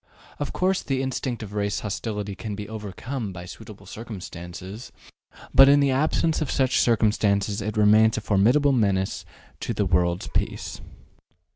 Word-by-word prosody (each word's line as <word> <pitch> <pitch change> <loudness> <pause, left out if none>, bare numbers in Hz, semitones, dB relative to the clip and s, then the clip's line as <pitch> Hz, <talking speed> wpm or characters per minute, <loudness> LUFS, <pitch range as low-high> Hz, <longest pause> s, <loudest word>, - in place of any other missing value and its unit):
Of 145 - -3
course 185 +1 +1
the 135 -1 -1
instinct 130 -3 -3
of 105 -1 -9
race 100 0 -1
hostility 105 -1 -4
can 105 +1 -6
be 105 0 -6
overcome 110 +2 -5
by 90 -1 -8
suitable 105 +1 -11
circumstances; 95 -1 -8 0.6
but 135 +1 +8
in 145 +1 +6
the 140 -1 +3
absence 155 +4 +1
of 155 - -1
such 130 -1 +2
circumstances 105 -3 +2
it 105 +1 -3
remains 110 +1 +5
a - - -2
formidable 115 +8 +3
menace 100 -6 0 0.3
to - - -3
the - - +1
world's 85 0 +1
peace. - - -3
110 Hz, 150 wpm, -25 LUFS, 100-130 Hz, 0.6 s, but